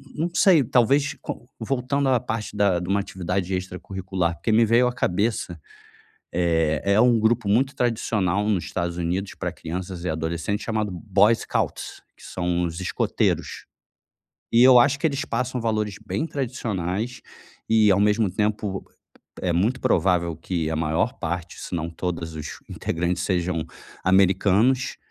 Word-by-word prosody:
não 165 +3 -1
sei, 175 -9 +5
talvez, 135 +4 +2
com - - -7
voltando 135 +1 0
à 125 -2 +4
parte 110 -3 -4
da 100 -3 +3
de 90 - -6
uma 100 +1 +2
atividade 95 -1 -3
extracurricular, 95 -1 -3
porque 85 - -3
me 110 +2 +5
veio 115 +3 +4
à - - -3
cabeça. 95 -5 -1 0.8
Eh, 80 -3 +1
é - - +4
um 120 -2 +5
grupo 110 -1 +1
muito 130 +7 +2
tradicional 105 -4 0
nos 95 -5 +1
Estados 85 -1 -3
Unidos 90 +3 -2
pra - - -3
crianças 90 +1 -6
e 90 - -2
adolescentes, 85 +6 -2
chamado 110 -2 -1
Boy 100 +4 +3
Scouts, - - -3 0.2
que - - -18
são 90 -1 -1
os 85 0 -3
escoteiros 90 - -1 0.9
e 115 +1 +6
eu 130 -1 +8
acho 140 +3 +4
que - - -15
eles 145 0 -1
passam 125 0 -2
valores 105 -3 -1
bem 155 - -1
tradicionais, 115 - -3 0.5
e 110 -2 +5
ao 95 - +4
mesmo 105 0 +2
tempo 105 0 -2 0.6
é 90 - 0
muito 110 +9 +1
provável 85 -2 +1
que 80 -1 -3
a 80 - -1
maior 80 0 0
parte, 85 +1 -4
se - - -6
não 85 0 -2
todos 85 -1 -4
os 75 - -7
integrantes 90 +2 -2
sejam 90 -3 -1 0.4
americanos 95 +6 +3
100 Hz, 155 wpm, -24 LUFS, 90-115 Hz, 0.9 s, eu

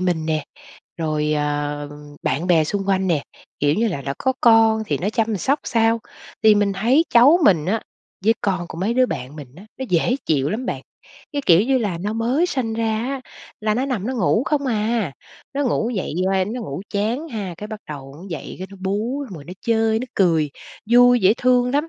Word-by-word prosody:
mình 175 -4 0
nè, 155 -2 -1 0.5
rồi, 155 -2 -1
ờ, 145 0 -2 0.3
bạn 160 +6 -1
bè 165 -3 +4
xung 195 +5 -3
quanh 190 -1 +2
nè, 160 -5 +1 0.4
kiểu 145 +1 +2
như 225 +5 +1
là, 170 -9 -4
đã 135 0 -3
có 260 - +1
con 225 -1 +5
thì - - -1
nó 195 +4 -1
chăm 225 -1 0
sóc 275 - +1
sao. 230 -1 +2 0.4
Thì 215 -1 +7
mình 205 -1 +2
thấy 240 +11 +3
cháu 275 +9 +7
mình 165 - +4
á 220 +4 0 0.4
với 225 +2 +5
con 185 -3 -1
của 160 - -8
mấy 205 +6 0
đứa 255 0 +4
bạn 130 - -6
mình 140 -4 -10
á, 190 - -12
nó 265 - -3
dễ 180 +9 +2
chịu 145 -3 +1
lắm 235 +6 -3
bạn, - - -3 0.5
cái, 285 -1 -2
kiểu 170 0 +7
như 260 +3 +2
là, 200 -8 -2
nó 205 +5 -3
mới 240 +9 +1
sinh 250 -9 -2
ra 225 0 -1 0.2
á 275 -1 -3 0.4
là 215 0 +1
nó 255 +4 0
nằm 230 -7 -2
nó 260 - -2
ngủ 220 0 +2
không 285 -1 0
à, 220 - 0 0.4
nó 285 - 0
ngủ 235 -2 0
dậy 195 -9 -3
qua 190 -1 +2
nó 225 +6 -5
ngủ 145 -8 -5
chán 225 +10 -1
ha, 205 - -5
cái 210 - -7
bắt 215 -1 -7
đầu 135 -2 -8
nó 170 - -12
dậy 165 - -6
cái 185 - -5
nó 200 - -11
bú 215 +9 -2
xong 195 - -9
rồi 150 -4 -10
nó 175 - -9
chơi 225 -1 +2
nó 245 - -4
cười, 165 -6 +2 0.4
vui 245 0 +6
dễ 195 +2 +5
thương 250 -1 +3
lắm. 295 +5 0
210 Hz, 220 wpm, -21 LUFS, 170-240 Hz, 0.5 s, Thì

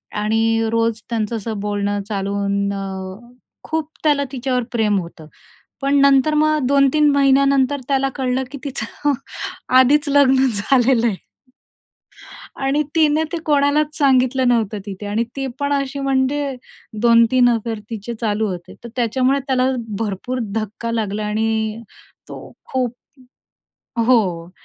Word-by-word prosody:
आणि 225 +2 +1
रोज 230 -1 0
त्यांचं 230 -1 -2
असं 220 0 -5
बोलणं 205 0 -2
चालू 200 -1 -2
होऊन 200 0 -1 0.9
खूप 315 -1 -3
त्याला 295 -2 +3
तिच्यावर 255 -1 -1
प्रेम 215 -4 +1
होतं. 170 -3 -10 0.5
पण 275 +1 +1
नंतर 280 +2 +4
मग 305 0 +2
2-3 280 +2 +4
महिन्यानंतर 275 0 +3
त्याला 270 -1 +1
कळलं 260 -1 -1
की 285 - -6
तिचं 280 +1 -2 0.7
आधीच 290 +4 +4
लग्न 270 -2 +4
झालेलं 240 +3 +2
आहे. 215 - 0 1.5
आणि 280 +2 +2
तिने 310 -1 +3
ते 345 - -2
कोणालाच 295 +1 +2
सांगितलं 260 -2 +3
नव्हतं 220 -3 0
तिथे 200 0 -7
आणि 210 +3 0
ती 270 -1 -3
पण 285 0 0
अशी, 275 0 -2
म्हणजे 275 +1 0 0.5
2-3 235 +1 +5
अफेअर 230 -1 -2
तिचे 225 +1 -5
चालू 215 -1 0
होते, 180 -3 -7
तर 235 - -8
त्याच्यामुळे 255 +3 +1
त्याला 260 -1 +2 0.3
भरपूर 225 +4 -3 0.2
धक्का 220 +1 -3
लागला 215 -2 -2
आणि 220 +1 -1 0.5
तो - - -10 0.2
खूप 255 -3 -1 1.1
हो, 185 -9 +2
250 Hz, 125 wpm, -19 LUFS, 220-275 Hz, 1.5 s, 2-3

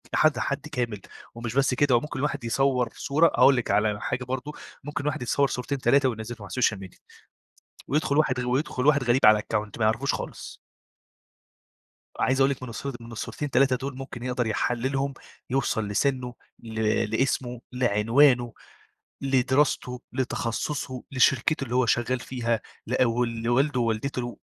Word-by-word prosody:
حد 155 -1 +3
حد 140 +2 -2
كامل، 120 -7 -3 0.3
ومش 120 0 -5
بس 135 -1 +3
كده، 135 0 +3
وممكن 130 +3 -2
الواحد 145 -3 -2
يصور 125 0 +1
صورة 155 +4 +3
أقول 140 -3 +5
لِك 120 -5 -1
على 105 0 +1
حاجة 125 - -2
برضه، 130 +3 -4 0.3
ممكن 145 +1 -4
الواحد 150 -2 -2
يتصور 140 +3 +2
صورتين 135 +2 -3
3 135 0 +3
وينزلهم 115 0 -6
على 100 - -8
السوشيال 115 -3 +1
ميديا 95 -2 -11 0.9
ويدخل 145 -1 +1
واحد 130 -4 +2
غ 125 - -3
ويدخل 130 0 -1
واحد 145 -3 +4
غريب 120 +2 +3
على 105 0 +7
الأكاونت 105 +1 -3
ما 110 - +1
يعرفوش 115 +6 +1
خالص - - -7 1.6
عايز 130 +1 +2
أقول 135 +1 +4
لِك 130 -2 -5
من 125 - -6
الص 115 +4 -7
من 115 0 -11
الصورتين 145 +5 -5
3 130 0 +3
دول 130 +1 -5
ممكن 130 -3 -8
يقدر 125 -2 -1
يحللهم، 130 +5 -1 0.4
يوصل 120 -5 0
لسنّه 125 +3 0 0.3
ل 110 -1 -7 0.3
لاسمه، 125 +1 -1
لعنوانه، 120 +1 +3 0.7
لدراسته، 130 -1 +1
لتخصصه، 130 +1 -3
لشركته 135 +2 +2
اللي 125 -1 -4
هو 130 -1 +3
شغال 120 +2 +1
فيها، 120 -2 -2 0.3
لأ 125 +2 +2
و 120 +1 +1
لوالده 120 +4 0
ووالدته 120 +2 -2
125 Hz, 155 wpm, -26 LUFS, 115-135 Hz, 1.6 s, على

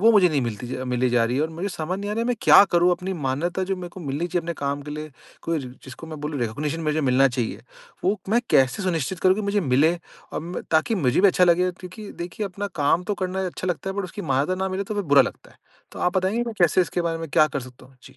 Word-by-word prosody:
वो 225 +3 +6
मुझे 190 -4 +6
नहीं 145 -4 +1
मिलती 120 0 -4 0.2
मिली 125 0 +1
जा 120 -1 +3
रही 120 +2 -1
है 145 - +2
और 160 - 0
मुझे 170 +5 -4
समझ 180 +1 -3
नहीं 205 +1 -4
आ - - -1
रहा 230 - -1
है 235 - -1
मैं 245 - +1
क्या 200 - +8
करूँ 175 +1 +4
अपनी 185 +2 -3
मान्यता 170 +8 -1
जो - - +2
मेरे 180 -1 -6
को 185 - -11
मिलनी 150 +2 -2
चाहिए 175 0 -1
अपने 170 - -3
काम 140 0 -2
के 150 - -8
लिए? 155 0 -6 0.3
कोई 165 -1 -1
ज 130 - -7 0.2
जिसको 130 +5 -10
मैं 155 -2 -8
बोलूँ 150 -3 -3
रिकॉग्निशन 145 +8 -2
मुझे 155 0 0
मिलना 135 -1 +4
चाहिए 120 -2 -3 0.4
वो 200 +2 +2
मैं 235 +2 +4
कैसे 130 +8 +3
सुनिश्चित 170 0 -1
करूँ 185 0 +5
कि 215 - -2
मुझे 200 0 +1
मिले? 145 +2 +3 0.4
अम, 170 +3 -4
ताकि 160 +7 +2
मुझे 145 - +2
भी 200 - +6
अच्छा 180 - +4
लगेगा 180 +1 +3
क्योंकि 195 +3 -9
देखिए 180 +4 -4
अपना 200 +2 -5
काम 145 +5 +3
तो 205 - -1
करना 185 +1 -1
अच्छा 180 +1 -4
लगता 180 +2 -2
है 195 - -6
बट 200 - -1
उसकी 190 +3 -7
मान्यता 145 +8 +1
ना 190 - 0
मिले 190 +1 -2
तो 215 - -5
फ़िर 205 -2 -2
बुरा 145 -2 +6
लगता - - -7
है। - - -22 0.4
तो - - -9
आप 180 +1 +1
बताएँगे 190 +5 +1
कि 240 - -5
मैं 225 - -5
कैसे 175 +2 +4
इसके 180 0 0
बारे 165 -1 -1
में 165 - -6
क्या 155 0 +5
कर 140 -1 -3
सकता 125 0 -13
हूँ? 130 0 -23
जी। - - -15
170 Hz, 280 wpm, -24 LUFS, 140-190 Hz, 0.4 s, क्या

